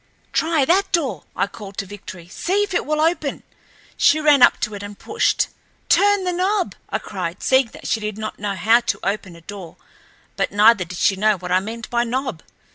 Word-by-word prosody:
"Try 320 -4 +2
that 385 +6 +2
door," 270 - -1
I - - +1
called 200 -1 -11
to 195 - -2
Victory. 185 -3 -10
"See 380 - 0
if 410 - -4
it - - -1
will 305 0 0
open." 315 -3 0 0.5
She 310 - +4
ran 295 -3 +4
up - - +6
to 210 - -2
it 200 - -6
and 205 0 -8
pushed. 435 +2 +1 0.4
"Turn 405 -1 +4
the 360 -1 -1
knob!" 375 +2 0 0.2
I - - 0
cried, - - -6
seeing 260 -1 +4
that - - -11
she 225 - +1
did 210 -1 -4
not 215 0 -6
know 200 -1 -2
how 225 +6 +4
to 235 - -2
open 195 -3 -3
a 170 - -14
door, 185 -1 -10 0.6
but - - 0
neither 205 -1 +5
did 175 +1 -8
she 195 - +3
know 215 +1 +3
what 180 0 -7
I 185 - +4
meant 225 +3 -7
by 240 0 +2
knob. 245 - -3
225 Hz, 210 wpm, -21 LUFS, 200-310 Hz, 0.6 s, up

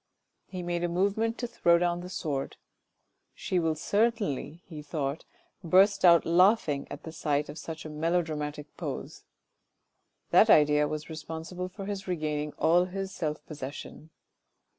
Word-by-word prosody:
He 185 -2 -6
made 175 0 -2
a - - +2
movement 200 +6 0
to 245 - -3
throw 170 -7 +3
down 175 0 0
the 180 - -8
sword. 145 -7 -3 0.4
" - - -49 0.3
She 185 - -1
will 165 -2 0
certainly," 200 - -1
he 155 -3 -9
thought, 145 0 -3 0.2
" - - -45
burst 190 +4 +4
out 170 -2 +7
laughing 170 -5 +3
at 145 - -8
the 160 - -7
sight 150 -2 -1
of 150 +2 -7
such 160 0 -7
a - - -5
melodramatic 150 -2 -2
pose: - - -6 0.5
" - - -50
that - - +6
idea 150 -1 +5
was 155 0 -5
responsible 160 +3 -6
for 195 +1 -8
his 200 -1 -5
regaining 150 -4 -2
all 175 +2 +3
his 195 +1 -5
self 150 -3 -3
possession. 145 +1 -8
165 Hz, 160 wpm, -28 LUFS, 150-185 Hz, 0.5 s, out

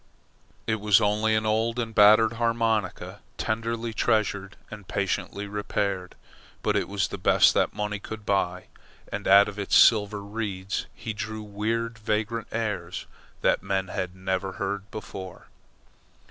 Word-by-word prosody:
It 110 0 0
was 105 -1 +5
only 105 +2 +2
an 110 0 0
old 110 +2 +1
and 115 -2 -2
battered 110 +2 +6
harmonica, 115 -2 -1 0.2
tenderly 115 +1 -2
treasured 100 -2 0 0.2
and 105 -3 -10
patiently 100 +1 -2
repaired; 100 -2 -2 0.5
but - - +1
it - - +1
was 100 -1 0
the 100 - -6
best - - +5
that - - +1
money 105 0 -2
could 110 +1 -8
buy, 90 -2 0 0.5
and - - -4
out 100 +1 +7
of 105 0 -7
its 100 - 0
silver 105 -2 +5
reeds 100 -2 -4
he 110 - -5
drew 110 0 -5
weird 110 +2 -2
vagrant 110 +1 -1
airs 105 -6 -3 0.4
that - - +2
men 95 -1 -1
had 90 0 -4
never 95 0 -2
heard 100 +1 -4
before. 95 -4 -8
105 Hz, 145 wpm, -26 LUFS, 100-110 Hz, 0.5 s, out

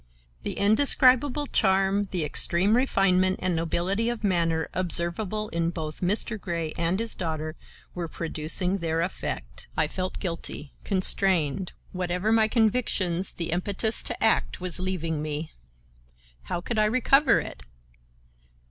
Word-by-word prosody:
The - - -4
indescribable 255 +5 +4
charm, 195 -3 +2
the 175 -5 -1
extreme 185 +7 +3
refinement 190 -7 +2
and 185 -2 0
nobility 180 +7 0
of 240 -2 -4
manner 165 -4 +1
observable 185 +4 -1
in 170 0 0
both 155 -3 -6
Mr. 205 +3 0
Grey 170 -3 -3
and 170 +3 0
his 230 0 0
daughter 155 -2 -4 0.4
were 175 -2 -4
producing 165 +4 -1
their 165 -1 -1
effect. 175 +3 -4
I - - +2
felt 185 0 -4
guilty; 165 -5 -5
constrained. 185 -3 +1 0.2
whatever 180 +3 -1
my 220 -1 +4
convictions, 210 -6 +1
the 170 -1 -3
impetus 200 +5 -1
to - - -4
act 220 - +2
was 180 0 -4
leaving 165 -4 -2
me. 150 +1 -4 0.9
How 175 - -3
could 220 +4 -2
I 215 - +4
recover 255 +5 +4
it? - - -7
185 Hz, 130 wpm, -26 LUFS, 170-215 Hz, 0.9 s, indescribable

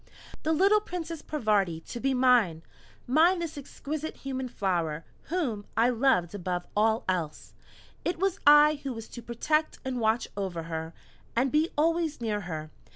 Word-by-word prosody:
The 315 - 0
little 390 +6 +4
Princess 335 -5 -5
Parvati 210 - 0
to 240 - -7
be 270 +1 +1
mine! 240 -11 +3 0.4
Mine 325 +8 +4
this 335 -2 -4
exquisite 295 +2 -5
human 260 -1 -4
flower 170 -8 -1 0.2
whom 275 - -2
I 230 +2 +5
loved 230 -9 +2
above 180 -2 -3
all 220 +2 +2
else! 170 -5 -3 0.5
It 350 - -1
was 385 +2 0
I 295 0 +7
who 270 -2 -4
was 225 -1 -8
to 240 - -8
protect 300 +7 0
and 255 -1 -2
watch 225 +1 +1
over 185 -4 -3
her, 160 0 -5 0.4
and 255 +2 +2
be 310 +2 +2
always 325 -1 +1
near 215 -3 -1
her! 155 -4 -6
245 Hz, 155 wpm, -28 LUFS, 190-305 Hz, 0.5 s, I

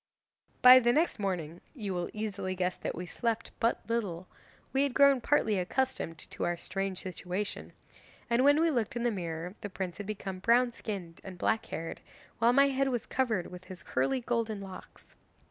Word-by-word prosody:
'By 255 +1 +11
the 240 -1 +3
next 310 -1 +1
morning 175 -5 -3
you 205 -7 -3
will 175 -1 -2
easily 200 -3 -3
guess 180 0 0
that - - -4
we 180 - -5
slept 230 +5 -2
but 230 - 0
little 195 -7 -2 0.5
we 270 - +3
had 280 -3 0
grown 280 -2 +6
partly 220 -7 +2
accustomed 185 -3 -1
to - - -4
our 175 0 0
strange 190 +1 -3
situation, 185 +2 -4 0.6
and 240 +2 +3
when 290 +2 +6
we 330 0 +3
looked 235 -5 -1
in 240 - -2
the 240 - +2
mirror, 170 -2 -4
the 205 - -5
prince 185 -1 -5
had 205 - -5
become 195 -3 -5
brown 240 +5 +4
skinned 190 -8 -6
and 190 -2 -8
black 220 +5 0
haired, 165 0 -5 0.4
while 230 +1 +5
my 275 +2 +5
head 270 0 +1
was 245 -4 -2
covered 225 -10 -1
with 180 0 -10
his 185 -2 -10
curly 135 - 0
golden 230 -3 -1
locks. 195 -1 -11
210 Hz, 185 wpm, -31 LUFS, 185-245 Hz, 0.6 s, By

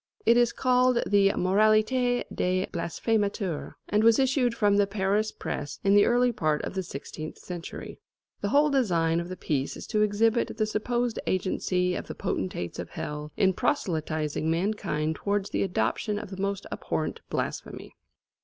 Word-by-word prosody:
It 230 +2 +6
is 240 -1 +4
called 250 -1 +3
the 200 -1 +4
"Moralité 215 +6 +3
des 185 +1 0
Blasphémateurs," 195 +1 -1
and 210 +1 +2
was 230 0 +6
issued 260 -3 +2
from 205 -2 +3
the 205 -1 +3
Paris 205 +2 0
press 145 - -5
in 195 - +4
the 205 0 +6
early 245 +1 +3
part 155 -8 0
of - - -4
the 190 - -1
sixteenth 155 -2 -7
century. 175 -1 -8 0.4
The 205 - -1
whole 290 +5 +4
design 170 -11 +2
of 170 +1 -5
the 185 - -6
piece 140 -3 -2
is - - -8
to 210 - +1
exhibit 220 +2 +2
the 215 - +2
supposed 240 +2 -1
agency 180 -1 0
of - - -4
the - - -6
potentates 90 -2 -3
of - - -5
Hell 150 0 -5
in 190 -2 +3
proselytising 155 -3 -1
mankind 165 -3 -1
towards 200 0 -1
the - - 0
adoption 195 - 0
of 210 -2 -7
the 190 0 -6
most 200 0 -2
abhorrent - - -3
blasphemy. - - -4
200 Hz, 165 wpm, -27 LUFS, 170-225 Hz, 0.4 s, It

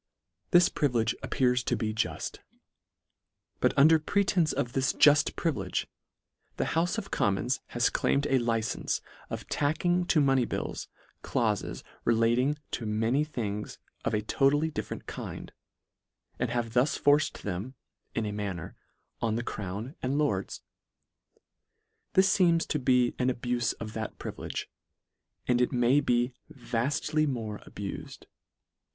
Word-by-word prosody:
This 175 -2 +6
privi 145 -5 0
lege 110 -1 +2
appears 125 -1 +1
to - - +1
be 110 -2 -2
juft; 110 - -2 1.2
but - - +3
under 155 +3 +7
pretence 180 -1 +2
of 120 0 -2
this 135 0 +1
juft 145 0 +5
privilege, 105 - -1 0.7
the - - +1
houfe 175 +6 +1
of 200 -3 -5
Commons 100 +6 +1
has 120 0 +1
claimed 140 +1 +1
a 135 -2 +3
licence 115 -2 -1 0.3
of - - -5
tacking 175 +5 +1
to 165 - +4
money 135 -3 +4
bills, - - -4 0.3
claufes - - -1 0.2
relating 120 +5 +2
to 115 - -3
many 115 +7 +1
things 105 -8 -4 0.3
of - - 0
a 105 - -1
total 140 +6 +3
ly 160 - 0
different 155 - -5
kind, - - -7 0.9
and 120 - 0
have 120 -2 -2
thus 125 +5 +2
forced 145 +2 +2
them, 105 +7 -4 0.4
in 115 - 0
a 105 - -2
manner, 100 -5 -4 0.5
on 110 -2 +1
the 120 - -1
crown 105 +5 -5
and 130 +2 0
lords. 150 -1 -1 1.5
This 190 0 +5
feems 170 -3 +4
to 150 - 0
be 125 -2 +3
an 125 0 +2
abufe 120 -1 -1
of 110 -1 -6
that 110 -1 -5
privilege, - - -5 0.8
and 125 0 +3
it 125 - +2
may 125 +3 +4
be 120 -2 +1 0.2
vaftly 135 +5 0
more 110 -6 -3
abufed. 100 -1 -7
125 Hz, 140 wpm, -29 LUFS, 115-145 Hz, 1.5 s, under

